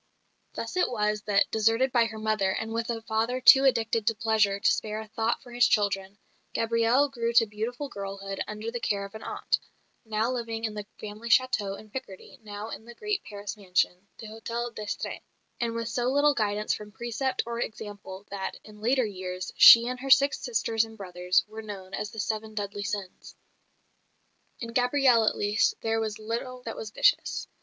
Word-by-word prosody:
Thus -, -, -5 dB
it 365 Hz, -, +3 dB
was 210 Hz, -3 st, 0 dB
that, 205 Hz, -1 st, +3 dB
deserted 225 Hz, +4 st, +2 dB
by 240 Hz, -2 st, +4 dB
her 220 Hz, -1 st, -6 dB
mother, 215 Hz, -3 st, +1 dB
and 220 Hz, +3 st, -3 dB
with 230 Hz, 0 st, -2 dB
a 225 Hz, -1 st, -3 dB
father 225 Hz, +3 st, 0 dB
too 270 Hz, +1 st, +8 dB
addicted 225 Hz, -4 st, +2 dB
to 225 Hz, -, +3 dB
pleasure 210 Hz, -2 st, +2 dB
to -, -, +4 dB
spare 215 Hz, 0 st, -2 dB
a 220 Hz, -, -8 dB
thought 225 Hz, +2 st, -1 dB
for 245 Hz, -, -13 dB
his 245 Hz, +1 st, +4 dB
children, 200 Hz, -1 st, 0 dB, 0.4 s
Gabrielle 230 Hz, +4 st, +3 dB
grew 235 Hz, -4 st, -2 dB
to 230 Hz, -1 st, +6 dB
beautiful 225 Hz, +6 st, -4 dB
girlhood 195 Hz, -3 st, -6 dB
under 215 Hz, +2 st, -5 dB
the 240 Hz, -, -4 dB
care 200 Hz, -3 st, -1 dB
of 200 Hz, -, -12 dB
an 220 Hz, -, -8 dB
aunt -, -, -1 dB, 0.4 s
now 220 Hz, +1 st, -1 dB
living 230 Hz, -2 st, -4 dB
in 220 Hz, -2 st, -1 dB
the 210 Hz, -1 st, -6 dB
family 215 Hz, +2 st, -7 dB
château 210 Hz, -6 st, +2 dB
in 215 Hz, -1 st, -15 dB
Picardy, 260 Hz, +2 st, -8 dB
now 210 Hz, 0 st, -7 dB
in 220 Hz, -, -8 dB
the 240 Hz, 0 st, -12 dB
great 420 Hz, -, -2 dB
Paris 205 Hz, 0 st, -6 dB
mansion, 185 Hz, -1 st, -1 dB
the -, -, -9 dB
Hotel 230 Hz, +2 st, -4 dB
d'Estrées; 215 Hz, -2 st, -5 dB, 0.4 s
and 230 Hz, -1 st, -1 dB
with 230 Hz, -1 st, -3 dB
so 240 Hz, +1 st, -1 dB
little 285 Hz, +2 st, +4 dB
guidance 210 Hz, -3 st, 0 dB
from 210 Hz, 0 st, -7 dB
precept 240 Hz, +4 st, -2 dB
or 235 Hz, 0 st, -4 dB
example 205 Hz, -3 st, -6 dB
that, 195 Hz, -1 st, -4 dB
in 210 Hz, -1 st, -14 dB
later 250 Hz, +2 st, +2 dB
years, 185 Hz, -2 st, -5 dB
she 235 Hz, +1 st, +10 dB
and 250 Hz, 0 st, -3 dB
her 270 Hz, +1 st, -5 dB
six 270 Hz, +1 st, +5 dB
sisters 230 Hz, -2 st, 0 dB
and 225 Hz, 0 st, -10 dB
brothers 180 Hz, -2 st, +1 dB
were 220 Hz, +1 st, -8 dB
known 195 Hz, -3 st, -9 dB
as 210 Hz, -, -3 dB
the 220 Hz, -, -9 dB
"Seven 215 Hz, +1 st, -3 dB
Deadly 205 Hz, -1 st, -4 dB
Sins." 200 Hz, -2 st, -5 dB, 1.3 s
In 230 Hz, -1 st, -5 dB
Gabrielle 250 Hz, -2 st, +4 dB
at -, -, +1 dB
least 205 Hz, +1 st, +2 dB
there 225 Hz, 0 st, 0 dB
was 220 Hz, -2 st, -2 dB
little 240 Hz, +3 st, -5 dB
that 225 Hz, -, -5 dB
was 220 Hz, -, -6 dB
vicious. -, -, +2 dB
220 Hz, 190 wpm, -27 LUFS, 205-235 Hz, 1.3 s, she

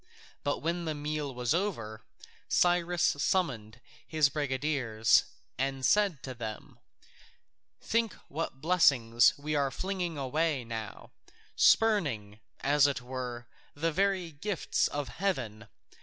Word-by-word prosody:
But 145 Hz, 0 st, -1 dB
when 170 Hz, +1 st, -1 dB
the 155 Hz, -1 st, -2 dB
meal 150 Hz, -1 st, -3 dB
was 125 Hz, 0 st, -1 dB
over, 115 Hz, -, -2 dB, 0.5 s
Cyrus 175 Hz, 0 st, +2 dB
summoned 130 Hz, -, 0 dB, 0.3 s
his 155 Hz, -3 st, +3 dB
brigadiers 130 Hz, -6 st, +1 dB, 0.3 s
and 135 Hz, 0 st, -1 dB
said 195 Hz, -, +2 dB
to 130 Hz, -, -5 dB
them: 110 Hz, -3 st, -8 dB, 1.0 s
"Think 230 Hz, -1 st, 0 dB
what 140 Hz, -3 st, -5 dB
blessings 130 Hz, -9 st, +4 dB
we 150 Hz, +2 st, -4 dB
are 140 Hz, -2 st, +2 dB
flinging 180 Hz, 0 st, -3 dB
away 145 Hz, +1 st, 0 dB
now, 115 Hz, -1 st, -7 dB, 0.4 s
spurning, 140 Hz, -, +3 dB, 0.2 s
as 145 Hz, +1 st, +4 dB
it 140 Hz, -2 st, -2 dB
were, 125 Hz, -1 st, -5 dB, 0.3 s
the 165 Hz, +3 st, 0 dB
very 190 Hz, 0 st, 0 dB
gifts 175 Hz, +5 st, -1 dB
of 145 Hz, -2 st, -4 dB
heaven! 120 Hz, -, -3 dB
145 Hz, 115 wpm, -30 LUFS, 125-170 Hz, 1.0 s, blessings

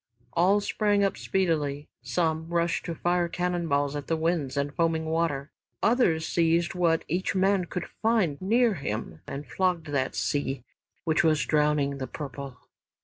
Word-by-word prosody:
All 190 Hz, +7 st, +4 dB
sprang 205 Hz, -1 st, +1 dB
up 195 Hz, -, +1 dB
speedily, 150 Hz, -6 st, -1 dB
some 160 Hz, -2 st, -1 dB
rushed 170 Hz, 0 st, 0 dB
to 170 Hz, -2 st, -3 dB
fire 175 Hz, +1 st, +1 dB
cannon 175 Hz, 0 st, -1 dB
balls 145 Hz, -1 st, +1 dB
at 145 Hz, -1 st, -5 dB
the 165 Hz, -, +1 dB
winds 160 Hz, -4 st, -1 dB
and 140 Hz, 0 st, -1 dB
foaming 165 Hz, -1 st, +1 dB
water, 160 Hz, -3 st, -1 dB, 0.3 s
others 205 Hz, -9 st, +3 dB
seized 170 Hz, 0 st, +2 dB
what 170 Hz, -3 st, +1 dB
each 180 Hz, +4 st, -1 dB
man 190 Hz, -1 st, +3 dB
could 180 Hz, -, -4 dB, 0.2 s
find 210 Hz, -10 st, +2 dB
near 230 Hz, +4 st, +3 dB
him 110 Hz, -, -4 dB
and 140 Hz, +2 st, -5 dB
flogged 175 Hz, -4 st, -1 dB
that 135 Hz, -2 st, 0 dB
sea 135 Hz, -3 st, -1 dB, 0.4 s
which 160 Hz, -1 st, +2 dB
was 155 Hz, -3 st, +3 dB
drowning 150 Hz, -2 st, +1 dB
"The 130 Hz, -, -3 dB
Purple." 140 Hz, -2 st, -7 dB
165 Hz, 155 wpm, -27 LUFS, 145-180 Hz, 0.4 s, All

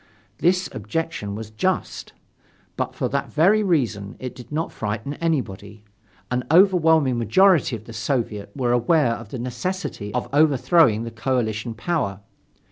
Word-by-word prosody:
This 180 Hz, +1 st, +2 dB
objection 160 Hz, -12 st, -4 dB
was 110 Hz, 0 st, -7 dB
just: 185 Hz, +13 st, -2 dB, 0.6 s
But -, -, -3 dB
for -, -, -1 dB
that 140 Hz, 0 st, -2 dB
very 190 Hz, +8 st, +4 dB
reason 120 Hz, -, 0 dB
it 130 Hz, -2 st, -6 dB
did 125 Hz, 0 st, -13 dB
not 160 Hz, +2 st, -2 dB
frighten 110 Hz, +5 st, -4 dB
anybody. 110 Hz, -, -3 dB, 0.5 s
An 125 Hz, 0 st, 0 dB
overwhelming 160 Hz, -7 st, +4 dB
majority 185 Hz, -, +4 dB
of 110 Hz, -1 st, -10 dB
the 115 Hz, -, -10 dB
Soviet 110 Hz, -3 st, -2 dB
was 125 Hz, -3 st, +1 dB
aware 120 Hz, +1 st, +3 dB
of 115 Hz, -2 st, -8 dB
the 130 Hz, -, -6 dB
necessity 125 Hz, -, -4 dB
of 125 Hz, -, -1 dB
overthrowing 145 Hz, -5 st, +4 dB
the 115 Hz, -, -6 dB
coalition 115 Hz, -1 st, -2 dB
power. 110 Hz, -, -2 dB
125 Hz, 140 wpm, -23 LUFS, 110-165 Hz, 0.6 s, very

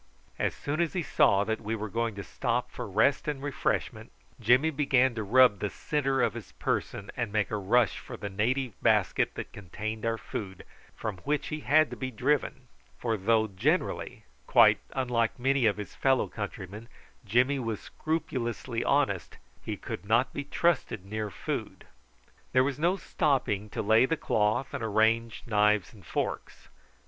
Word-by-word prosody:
As -, -, 0 dB
soon 150 Hz, +4 st, -2 dB
as 170 Hz, -, 0 dB
he 180 Hz, -3 st, -1 dB
saw 100 Hz, -8 st, +3 dB
that 110 Hz, +1 st, -2 dB
we 110 Hz, +1 st, -2 dB
were 110 Hz, 0 st, -4 dB
going 115 Hz, +1 st, -2 dB
to 100 Hz, -, -6 dB
stop -, -, -2 dB
for -, -, -6 dB
rest 110 Hz, +11 st, +2 dB
and 150 Hz, -2 st, -2 dB
refreshment, 120 Hz, -5 st, -2 dB, 0.3 s
Jimmy 125 Hz, +7 st, +4 dB
began 130 Hz, -3 st, +3 dB
to 110 Hz, -, -3 dB
rub 115 Hz, 0 st, +5 dB
the 105 Hz, -, -1 dB
centre 135 Hz, 0 st, 0 dB
of -, -, +1 dB
his -, -, -9 dB
person 100 Hz, 0 st, -3 dB
and 115 Hz, -3 st, -2 dB
make 105 Hz, -1 st, 0 dB
a 105 Hz, -, 0 dB
rush 110 Hz, +3 st, +2 dB
for -, -, -9 dB
the 100 Hz, -, -5 dB
native 120 Hz, +5 st, -1 dB
basket -, -, +2 dB
that -, -, -7 dB
contained 105 Hz, +3 st, -6 dB
our 115 Hz, 0 st, 0 dB
food, 95 Hz, -4 st, -6 dB, 0.3 s
from 105 Hz, -4 st, -4 dB
which 145 Hz, +11 st, -2 dB
he 155 Hz, -, -3 dB
had 150 Hz, +4 st, +3 dB
to -, -, -4 dB
be 130 Hz, -, -4 dB
driven; 135 Hz, +1 st, -1 dB, 0.3 s
for 115 Hz, -2 st, -1 dB
though 110 Hz, +2 st, +2 dB
generally, 115 Hz, -, -1 dB, 0.2 s
quite -, -, +6 dB
unlike 120 Hz, -3 st, 0 dB
many 130 Hz, -1 st, +2 dB
of 105 Hz, -, +1 dB
his 105 Hz, -2 st, -7 dB
fellow 135 Hz, -2 st, +2 dB
countrymen, 100 Hz, +1 st, -7 dB, 0.4 s
Jimmy 125 Hz, +6 st, +2 dB
was 115 Hz, -4 st, -3 dB
scrupulously 130 Hz, -7 st, -3 dB
honest, 130 Hz, -, 0 dB, 0.3 s
he -, -, -4 dB
could -, -, -6 dB
not 115 Hz, +5 st, +2 dB
be 145 Hz, -, -3 dB
trusted 155 Hz, -, 0 dB
near 105 Hz, +1 st, -3 dB
food. -, -, -5 dB, 0.7 s
There 130 Hz, 0 st, +5 dB
was 140 Hz, 0 st, -2 dB
no 175 Hz, +4 st, +3 dB
stopping 115 Hz, -, 0 dB
to -, -, -3 dB
lay 110 Hz, +4 st, +5 dB
the 165 Hz, -, 0 dB
cloth 110 Hz, +2 st, 0 dB
and -, -, -3 dB
arrange 110 Hz, +1 st, +1 dB
knives 105 Hz, -2 st, +2 dB
and 105 Hz, -3 st, -16 dB
forks. -, -, -4 dB
115 Hz, 170 wpm, -29 LUFS, 105-135 Hz, 0.7 s, quite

